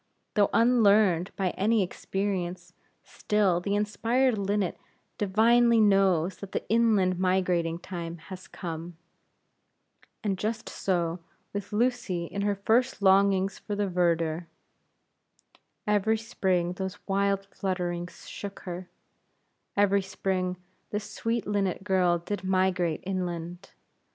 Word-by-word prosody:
Though 205 Hz, -1 st, +3 dB
unlearned 210 Hz, -7 st, +4 dB
by 190 Hz, -2 st, 0 dB
any 215 Hz, +1 st, +2 dB
experience, 180 Hz, -2 st, -3 dB, 0.3 s
still 200 Hz, -5 st, +1 dB
the 200 Hz, +2 st, -1 dB
inspired 230 Hz, +4 st, +1 dB
linnet 200 Hz, -2 st, -1 dB, 0.4 s
divinely 230 Hz, +4 st, +4 dB
knows 195 Hz, -4 st, +3 dB
that 200 Hz, -, -9 dB
the -, -, -3 dB
inland 210 Hz, -6 st, +3 dB
migrating 180 Hz, -3 st, +1 dB
time 170 Hz, -1 st, -6 dB
has 185 Hz, +3 st, -10 dB
come. 165 Hz, -1 st, -7 dB, 1.3 s
And 195 Hz, -3 st, -1 dB
just 220 Hz, +1 st, -3 dB
so 175 Hz, -2 st, -1 dB, 0.3 s
with 200 Hz, -1 st, -5 dB
Lucy 215 Hz, -6 st, 0 dB
in 200 Hz, +4 st, -4 dB
her 205 Hz, 0 st, +1 dB
first 225 Hz, +3 st, +1 dB
longings 195 Hz, 0 st, +4 dB
for 205 Hz, -, -4 dB
the 205 Hz, 0 st, 0 dB
verdure. 170 Hz, -2 st, 0 dB, 1.4 s
Every 210 Hz, +1 st, +2 dB
spring 185 Hz, -6 st, 0 dB
those 190 Hz, +1 st, -5 dB
wild 195 Hz, 0 st, +1 dB
flutterings 180 Hz, -2 st, -3 dB
shook 200 Hz, -1 st, -7 dB
her; 180 Hz, 0 st, -7 dB, 0.9 s
every 200 Hz, 0 st, +4 dB
spring, 185 Hz, -1 st, -2 dB, 0.3 s
this 210 Hz, +1 st, -4 dB
sweet 230 Hz, 0 st, -1 dB
linnet 195 Hz, -3 st, -1 dB
girl 185 Hz, -3 st, +2 dB
did 185 Hz, +3 st, -5 dB
migrate 185 Hz, -3 st, +1 dB
inland. 180 Hz, -1 st, -4 dB
195 Hz, 115 wpm, -28 LUFS, 180-205 Hz, 1.4 s, unlearned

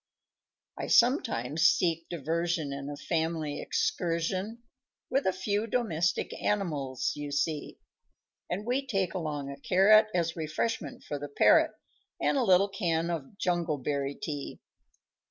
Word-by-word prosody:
_ -, -, -3 dB
_I -, -, -4 dB
sometimes 160 Hz, -, +3 dB
seek 165 Hz, -1 st, +3 dB
diversion 165 Hz, -1 st, -1 dB
In 140 Hz, 0 st, -5 dB
a 145 Hz, -, -6 dB
family 160 Hz, -1 st, -2 dB
excursion 185 Hz, +7 st, -1 dB, 0.5 s
With 270 Hz, +2 st, +1 dB
the 190 Hz, -, +3 dB
few 205 Hz, +3 st, -1 dB
domestic 175 Hz, -8 st, 0 dB
animals 145 Hz, -11 st, -1 dB
you 145 Hz, -1 st, -5 dB
see; 145 Hz, +1 st, -2 dB, 0.7 s
And 195 Hz, +4 st, -3 dB
we 255 Hz, +4 st, 0 dB
take 195 Hz, -7 st, 0 dB
along 150 Hz, -5 st, -3 dB
a 140 Hz, -, -9 dB
carrot 215 Hz, +7 st, +5 dB
As 170 Hz, -2 st, 0 dB
refreshment 155 Hz, +1 st, -3 dB
for 145 Hz, -, -4 dB
the 145 Hz, +1 st, -6 dB
parrot, 315 Hz, -, +4 dB, 0.5 s
And -, -, +1 dB
a 270 Hz, -, +2 dB
little 195 Hz, -1 st, +4 dB
can 170 Hz, -4 st, -1 dB
of 165 Hz, +3 st, -5 dB
jungleberry 150 Hz, -6 st, -1 dB
tea. 145 Hz, -3 st, -5 dB
170 Hz, 135 wpm, -29 LUFS, 145-195 Hz, 0.7 s, carrot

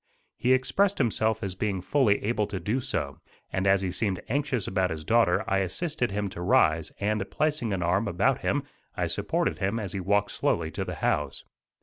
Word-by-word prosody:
He 125 Hz, +2 st, +2 dB
expressed 195 Hz, +10 st, +2 dB
himself 110 Hz, -3 st, +1 dB
as 95 Hz, -2 st, -2 dB
being 95 Hz, 0 st, -2 dB
fully 105 Hz, +2 st, +2 dB
able 105 Hz, -1 st, 0 dB
to 95 Hz, -, -4 dB
do 115 Hz, +7 st, -1 dB
so, 70 Hz, -, -3 dB, 0.3 s
and 95 Hz, +1 st, 0 dB
as 95 Hz, 0 st, +4 dB
he 90 Hz, -, -1 dB
seemed 95 Hz, 0 st, 0 dB
anxious 135 Hz, -4 st, 0 dB
about 95 Hz, -1 st, +1 dB
his 80 Hz, -1 st, -5 dB
daughter 115 Hz, -5 st, +3 dB
I 95 Hz, -, +2 dB
assisted 125 Hz, -, -1 dB
him 100 Hz, +1 st, -2 dB
to 85 Hz, -, -8 dB
rise; 80 Hz, -2 st, +3 dB
and, 105 Hz, -1 st, -1 dB
placing 150 Hz, -7 st, 0 dB
an 95 Hz, -3 st, -1 dB
arm 95 Hz, +6 st, +1 dB
about 100 Hz, 0 st, +1 dB
him -, -, 0 dB, 0.3 s
I -, -, +1 dB
supported -, -, -1 dB
him 100 Hz, +4 st, 0 dB
as 100 Hz, -5 st, -4 dB
he 100 Hz, -, -2 dB
walked 100 Hz, +2 st, +1 dB
slowly -, -, 0 dB
to -, -, -3 dB
the -, -, -5 dB
house. 75 Hz, -, 0 dB
100 Hz, 200 wpm, -27 LUFS, 95-115 Hz, 0.3 s, as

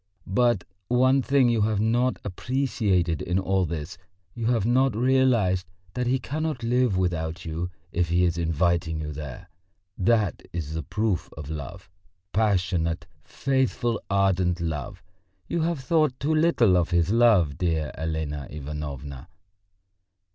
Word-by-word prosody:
"But 120 Hz, 0 st, +2 dB, 0.2 s
one 130 Hz, +3 st, +4 dB
thing 135 Hz, 0 st, +3 dB
you 115 Hz, -2 st, +2 dB
have 105 Hz, -1 st, +1 dB
not 120 Hz, +4 st, +2 dB
appreciated 100 Hz, -, 0 dB
in 90 Hz, +2 st, -1 dB
all 95 Hz, -1 st, +1 dB
this, 75 Hz, -2 st, -5 dB, 0.3 s
you 115 Hz, -1 st, -3 dB
have 115 Hz, -4 st, +2 dB
not 130 Hz, 0 st, +3 dB
realised 120 Hz, -7 st, +2 dB, 0.3 s
that 125 Hz, -1 st, -1 dB
he 130 Hz, +2 st, +2 dB
cannot 150 Hz, -1 st, -3 dB
live 120 Hz, -3 st, +2 dB
without 85 Hz, -2 st, -2 dB
you 85 Hz, +2 st, -3 dB, 0.2 s
if 85 Hz, -1 st, 0 dB
he 90 Hz, +1 st, +3 dB
is 85 Hz, -1 st, +1 dB
inviting 85 Hz, 0 st, 0 dB
you 75 Hz, -1 st, -4 dB
there; 75 Hz, +4 st, -8 dB, 0.5 s
that 105 Hz, 0 st, +2 dB
is 80 Hz, -2 st, -4 dB
a 80 Hz, -, -2 dB
proof 105 Hz, +4 st, -1 dB
of 80 Hz, -1 st, -6 dB
love, 80 Hz, +6 st, -7 dB, 0.5 s
passionate, 90 Hz, -5 st, +1 dB, 0.2 s
faithful, 130 Hz, -3 st, 0 dB
ardent 95 Hz, -3 st, +2 dB
love.... 80 Hz, -5 st, -4 dB, 0.4 s
You 170 Hz, -, -1 dB
have 165 Hz, -3 st, -1 dB
thought 150 Hz, -1 st, +1 dB
too 150 Hz, +4 st, 0 dB
little 155 Hz, -, +4 dB
of 85 Hz, -1 st, +1 dB
his 85 Hz, 0 st, +2 dB
love, 110 Hz, -, +4 dB
dear 80 Hz, -4 st, 0 dB
Elena 80 Hz, -3 st, -3 dB
Ivanovna!" 70 Hz, -1 st, -6 dB
95 Hz, 140 wpm, -25 LUFS, 80-120 Hz, 0.5 s, one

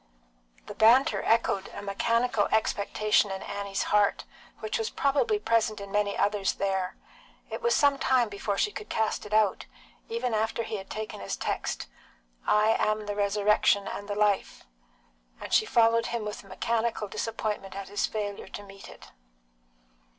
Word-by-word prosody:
The -, -, -8 dB
banter 250 Hz, +7 st, +5 dB
echoed 225 Hz, -4 st, +1 dB
a -, -, -6 dB
mechanical 230 Hz, +2 st, +1 dB
expectation 215 Hz, -1 st, +2 dB
in 190 Hz, 0 st, -5 dB
Annie's 200 Hz, -1 st, -3 dB
heart, 205 Hz, -1 st, +3 dB, 0.4 s
which 215 Hz, 0 st, -2 dB
was 225 Hz, -, -1 dB
probably 290 Hz, -, +1 dB
present 230 Hz, -, +1 dB
in 200 Hz, 0 st, -8 dB
many 205 Hz, -1 st, 0 dB
others 205 Hz, -1 st, +1 dB
there. 190 Hz, -2 st, -1 dB, 0.6 s
It -, -, -4 dB
was 475 Hz, 0 st, +2 dB
some 285 Hz, -1 st, +3 dB
time 255 Hz, -3 st, +3 dB
before 200 Hz, 0 st, -3 dB
she 420 Hz, -, +1 dB
could 425 Hz, +1 st, -8 dB
cast 220 Hz, -1 st, -1 dB
it -, -, -14 dB
out, 215 Hz, -2 st, +2 dB, 0.4 s
even 455 Hz, -, -2 dB
after 220 Hz, +2 st, 0 dB
he 220 Hz, -, -4 dB
had 190 Hz, 0 st, -9 dB
taken 215 Hz, 0 st, -5 dB
his 100 Hz, -, -4 dB
text, -, -, -3 dB, 0.6 s
"I 210 Hz, +1 st, +4 dB
am 215 Hz, 0 st, 0 dB
the 205 Hz, 0 st, -3 dB
Resurrection 205 Hz, 0 st, +2 dB
and 205 Hz, -, -6 dB
the 205 Hz, -, -2 dB
Life," 205 Hz, -1 st, 0 dB, 0.7 s
and -, -, -7 dB
she -, -, +4 dB
followed 230 Hz, 0 st, +3 dB
him 235 Hz, -2 st, -3 dB
with 210 Hz, 0 st, -6 dB
a -, -, -17 dB
mechanical 225 Hz, +2 st, -1 dB
disappointment 210 Hz, -2 st, -4 dB
at 200 Hz, -1 st, -6 dB
his 205 Hz, -, 0 dB
failure 205 Hz, -3 st, -4 dB
to 205 Hz, -, -8 dB
meet 195 Hz, 0 st, -12 dB
it. -, -, -14 dB
210 Hz, 165 wpm, -28 LUFS, 200-230 Hz, 0.7 s, banter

